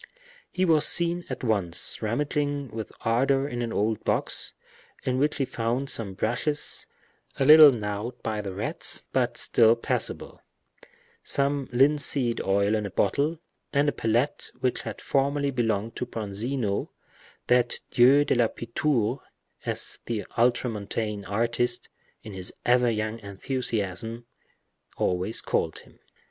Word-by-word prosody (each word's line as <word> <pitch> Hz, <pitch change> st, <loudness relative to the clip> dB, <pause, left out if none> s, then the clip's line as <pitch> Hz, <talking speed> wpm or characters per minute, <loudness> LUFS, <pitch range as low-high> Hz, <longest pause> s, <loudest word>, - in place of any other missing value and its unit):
He 185 Hz, -, 0 dB
was 160 Hz, -4 st, +5 dB
seen 170 Hz, 0 st, +2 dB
at -, -, -5 dB
once 100 Hz, -7 st, 0 dB
rummaging 145 Hz, +4 st, -1 dB
with 110 Hz, -1 st, -6 dB
ardor 135 Hz, +4 st, +1 dB
in 120 Hz, -3 st, -4 dB
an 115 Hz, -1 st, -3 dB
old 110 Hz, +1 st, -1 dB
box, -, -, +2 dB, 0.5 s
in 130 Hz, 0 st, 0 dB
which 150 Hz, +2 st, +1 dB
he 135 Hz, -, 0 dB
found 120 Hz, +3 st, -2 dB
some 100 Hz, -4 st, -1 dB
brushes, 125 Hz, +9 st, -1 dB, 0.5 s
a 135 Hz, -, +2 dB
little 155 Hz, +1 st, +10 dB
gnawed 110 Hz, +1 st, -4 dB
by 110 Hz, -1 st, -2 dB
the 100 Hz, -2 st, -5 dB
rats, 100 Hz, +4 st, 0 dB
but -, -, 0 dB
still 115 Hz, 0 st, +4 dB
passable; 115 Hz, -, -3 dB, 0.8 s
some 140 Hz, -1 st, 0 dB
linseed 135 Hz, -2 st, +2 dB
oil 100 Hz, +2 st, +1 dB
in 105 Hz, -1 st, 0 dB
a -, -, -7 dB
bottle, 140 Hz, -, 0 dB, 0.3 s
and 145 Hz, +1 st, +2 dB
a -, -, 0 dB
palette 120 Hz, +5 st, 0 dB
which 125 Hz, -, -1 dB
had -, -, -7 dB
formerly 140 Hz, +1 st, 0 dB
belonged 115 Hz, -3 st, -1 dB
to 125 Hz, -, -3 dB
Bronzino, 110 Hz, 0 st, -2 dB, 0.6 s
that 125 Hz, -1 st, +2 dB
dieu 135 Hz, +4 st, +5 dB
de -, -, +1 dB
la 120 Hz, -2 st, +3 dB
pittoure, 120 Hz, +1 st, -1 dB, 0.5 s
as -, -, -2 dB
the 115 Hz, -3 st, -3 dB
ultramontane 110 Hz, -3 st, -1 dB
artist, 115 Hz, +4 st, 0 dB, 0.3 s
in 105 Hz, -, -9 dB
his 95 Hz, -1 st, -4 dB
ever 125 Hz, 0 st, +4 dB
young 110 Hz, 0 st, -2 dB
enthusiasm, 110 Hz, 0 st, -4 dB, 0.7 s
always 90 Hz, +4 st, 0 dB
called -, -, -1 dB
him. -, -, -15 dB
120 Hz, 135 wpm, -26 LUFS, 110-140 Hz, 0.8 s, little